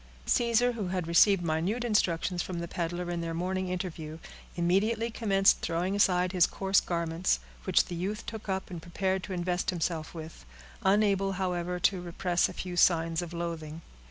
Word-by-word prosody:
Caesar, 240 Hz, 0 st, +3 dB
who 220 Hz, -5 st, -4 dB
had 180 Hz, -1 st, -2 dB
received 175 Hz, +3 st, +5 dB
minute 170 Hz, +9 st, -1 dB
instructions 180 Hz, -5 st, +1 dB
from 180 Hz, -, -5 dB
the 170 Hz, 0 st, -4 dB
peddler 175 Hz, +1 st, -3 dB
in 170 Hz, -1 st, -2 dB
their 165 Hz, 0 st, -3 dB
morning 185 Hz, +2 st, -2 dB
interview, 170 Hz, -4 st, -4 dB, 0.4 s
immediately 210 Hz, +7 st, +1 dB
commenced 195 Hz, -4 st, +3 dB
throwing 175 Hz, +4 st, -1 dB
aside 180 Hz, -3 st, +3 dB
his 180 Hz, -2 st, +4 dB
coarse 195 Hz, 0 st, +2 dB
garments, 170 Hz, -, 0 dB, 0.3 s
which -, -, +3 dB
the -, -, -7 dB
youth 195 Hz, +6 st, -3 dB
took 220 Hz, -2 st, -7 dB
up 190 Hz, 0 st, -2 dB
and 170 Hz, -2 st, -6 dB
prepared 190 Hz, +3 st, -1 dB
to 195 Hz, -, -8 dB
invest 180 Hz, 0 st, -1 dB
himself 165 Hz, -2 st, -2 dB
with; 160 Hz, -, -9 dB, 0.4 s
unable, 195 Hz, 0 st, +2 dB
however, 180 Hz, -1 st, -2 dB
to 180 Hz, +1 st, +2 dB
repress 175 Hz, 0 st, 0 dB
a -, -, -8 dB
few 180 Hz, -1 st, -5 dB
signs 165 Hz, -1 st, +3 dB
of 175 Hz, -1 st, -6 dB
loathing. 165 Hz, -2 st, -5 dB
180 Hz, 170 wpm, -29 LUFS, 170-195 Hz, 0.4 s, received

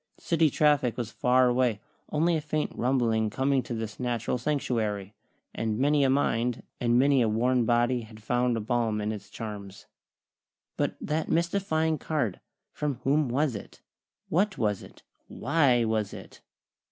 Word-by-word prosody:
City 165 Hz, -2 st, +2 dB
traffic 145 Hz, -4 st, +2 dB
was 120 Hz, -3 st, -3 dB
far 125 Hz, +2 st, +3 dB
away, 125 Hz, -3 st, +1 dB, 0.3 s
only 165 Hz, +3 st, +2 dB
a 155 Hz, -, 0 dB
faint 150 Hz, 0 st, -2 dB
rumbling 115 Hz, -4 st, +1 dB
coming 135 Hz, +3 st, +1 dB
to 120 Hz, -, -5 dB
this 110 Hz, -1 st, -5 dB
natural 120 Hz, 0 st, -1 dB
sanctuary; 110 Hz, -8 st, -1 dB, 0.4 s
and 110 Hz, -1 st, -2 dB
many 145 Hz, +3 st, +3 dB
a 135 Hz, -, +3 dB
mind, 125 Hz, -3 st, +1 dB, 0.2 s
and 120 Hz, 0 st, +2 dB
many 135 Hz, 0 st, +4 dB
a 115 Hz, -, +2 dB
worn 120 Hz, +2 st, +2 dB
body 120 Hz, +1 st, +2 dB
had 110 Hz, -1 st, -12 dB
found 120 Hz, +1 st, +1 dB
a -, -, -1 dB
balm 110 Hz, -1 st, 0 dB
in 105 Hz, +1 st, -1 dB
its 105 Hz, -2 st, -7 dB
charms. 100 Hz, -3 st, -8 dB, 0.9 s
But -, -, -1 dB
that 155 Hz, +1 st, -2 dB
mystifying 165 Hz, -2 st, +1 dB
card! 145 Hz, -, -2 dB, 0.3 s
From 150 Hz, -2 st, -2 dB
whom 145 Hz, 0 st, +2 dB
was 135 Hz, 0 st, +1 dB
it? 100 Hz, -, -10 dB, 0.4 s
What 195 Hz, +4 st, +1 dB
was 105 Hz, -3 st, 0 dB
it? -, -, -15 dB, 0.2 s
Why 130 Hz, -7 st, +2 dB
was 110 Hz, -2 st, -1 dB
it? -, -, -12 dB
125 Hz, 155 wpm, -28 LUFS, 110-145 Hz, 0.9 s, many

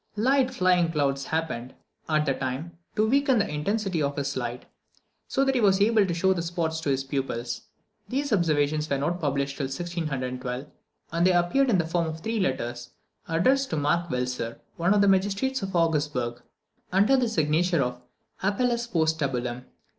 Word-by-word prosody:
Light 260 Hz, +4 st, +3 dB
flying 180 Hz, -7 st, +2 dB
clouds 140 Hz, -3 st, 0 dB
happened, 155 Hz, -6 st, -3 dB, 0.3 s
at 155 Hz, -1 st, +2 dB
the 135 Hz, -, +2 dB
time, 130 Hz, +6 st, -4 dB, 0.2 s
to 215 Hz, 0 st, +2 dB
weaken 275 Hz, +1 st, +3 dB
the 200 Hz, -, +2 dB
intensity 185 Hz, +3 st, -1 dB
of 140 Hz, -1 st, 0 dB
his 140 Hz, 0 st, -2 dB
light, 120 Hz, -1 st, -4 dB, 0.6 s
so 270 Hz, 0 st, +1 dB
that 270 Hz, -, +2 dB
he 250 Hz, -, +1 dB
was 195 Hz, -2 st, +4 dB
able 210 Hz, -1 st, +4 dB
to 175 Hz, -, -1 dB
show 190 Hz, +3 st, +3 dB
the 175 Hz, -, -2 dB
spots 165 Hz, -1 st, -2 dB
to 150 Hz, -, -2 dB
his 135 Hz, 0 st, +1 dB
pupils. 135 Hz, -3 st, -3 dB, 0.5 s
These 275 Hz, 0 st, -1 dB
observations 155 Hz, -4 st, +1 dB
were 140 Hz, -, +1 dB
not 170 Hz, +6 st, -1 dB
published 140 Hz, -1 st, -1 dB
till 140 Hz, -, -1 dB
January 150 Hz, -3 st, -3 dB
1612; 125 Hz, +1 st, -4 dB, 0.5 s
and 170 Hz, +2 st, +3 dB
they 185 Hz, -, +4 dB
appeared 175 Hz, +10 st, +3 dB
in 210 Hz, -, +4 dB
the 170 Hz, -, +1 dB
form 165 Hz, 0 st, 0 dB
of 160 Hz, 0 st, -6 dB
three 225 Hz, +3 st, -2 dB
letters, 120 Hz, -8 st, -2 dB, 0.4 s
addressed 260 Hz, +12 st, +2 dB
to -, -, -2 dB
Mark 170 Hz, +4 st, +1 dB
Velser, 125 Hz, -3 st, -3 dB, 0.2 s
one 175 Hz, +4 st, +2 dB
of 205 Hz, -, +4 dB
the 200 Hz, -, +4 dB
magistrates 200 Hz, +7 st, +1 dB
of 195 Hz, -1 st, -4 dB
Augsburg, 150 Hz, -8 st, 0 dB, 0.5 s
under 200 Hz, +8 st, +4 dB
the 250 Hz, -3 st, +2 dB
signature 165 Hz, -3 st, +2 dB
of 125 Hz, 0 st, -4 dB, 0.4 s
Appelles 235 Hz, +4 st, 0 dB
post 160 Hz, -1 st, +1 dB
Tabulam. 125 Hz, -3 st, -2 dB
165 Hz, 180 wpm, -26 LUFS, 140-200 Hz, 0.6 s, was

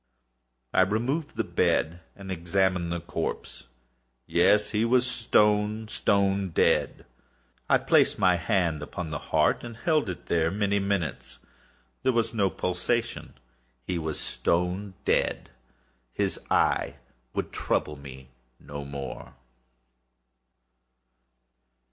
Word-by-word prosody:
I -, -, +5 dB
removed 120 Hz, -, 0 dB
the -, -, 0 dB
bed 85 Hz, +2 st, 0 dB
and 95 Hz, -1 st, -8 dB
examined 90 Hz, 0 st, 0 dB
the 85 Hz, -1 st, -2 dB
corpse. -, -, -5 dB, 0.6 s
Yes, 105 Hz, 0 st, +3 dB
he 105 Hz, 0 st, +1 dB
was 125 Hz, +2 st, +3 dB
stone, 105 Hz, -2 st, +2 dB
stone 100 Hz, -2 st, +1 dB
dead. 80 Hz, -, +1 dB, 0.6 s
I -, -, +6 dB
placed -, -, +3 dB
my 90 Hz, -1 st, +4 dB
hand 85 Hz, -4 st, 0 dB
upon 80 Hz, +2 st, -6 dB
the 75 Hz, -, -3 dB
heart -, -, +2 dB
and 120 Hz, -1 st, -8 dB
held 155 Hz, -, +1 dB
it 90 Hz, -, -6 dB
there 80 Hz, -1 st, +1 dB
many 100 Hz, +1 st, 0 dB
minutes. 100 Hz, -4 st, -2 dB, 0.6 s
There 130 Hz, -, +2 dB
was 115 Hz, -1 st, 0 dB
no 100 Hz, -4 st, +2 dB
pulsation. 95 Hz, +8 st, -2 dB, 0.5 s
He 90 Hz, -2 st, -2 dB
was 80 Hz, -2 st, -3 dB
stone 90 Hz, +3 st, -1 dB
dead. -, -, 0 dB, 0.6 s
His -, -, -1 dB
eye -, -, +2 dB, 0.4 s
would -, -, -2 dB
trouble 75 Hz, -, -1 dB
me 65 Hz, -2 st, -11 dB, 0.3 s
no 70 Hz, 0 st, -7 dB
more. 70 Hz, -1 st, -7 dB
95 Hz, 115 wpm, -27 LUFS, 85-105 Hz, 0.6 s, I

